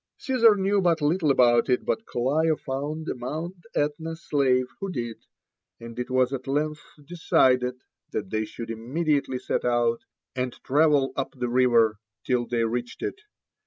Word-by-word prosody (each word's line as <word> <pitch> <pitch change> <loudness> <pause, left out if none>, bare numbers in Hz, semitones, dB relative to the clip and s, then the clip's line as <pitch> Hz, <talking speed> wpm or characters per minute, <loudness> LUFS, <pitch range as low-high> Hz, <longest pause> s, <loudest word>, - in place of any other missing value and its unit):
Caesar 235 -5 +4
knew 200 0 +1
but 170 -3 +2
little 155 +2 +1
about 120 -3 +4
it, 125 - +1
but 225 - -2
Clio 155 +6 +1
found 150 +4 -4
a - - -1
Mount 155 +8 -5 0.2
Etna 155 +3 -1
slave 135 -5 +1
who 195 - -4
did; 120 -6 -6 0.5
and 115 +1 -9
it 125 - -3
was 130 0 +2
at 130 0 -5
length 150 +3 -1 0.2
decided 125 -6 +2 0.3
that - - -4
they 110 0 0
should 115 +1 -7
immediately 140 +4 -1
set - - -2
out, 120 -1 +1 0.4
and 125 -1 -2
travel 145 -1 +3
up 135 - -3
the 125 -1 -2
river 120 -4 +3 0.3
till 125 -2 0
they 120 -1 0
reached 120 +2 -3
it. 405 - -4
130 Hz, 160 wpm, -25 LUFS, 120-155 Hz, 0.5 s, Caesar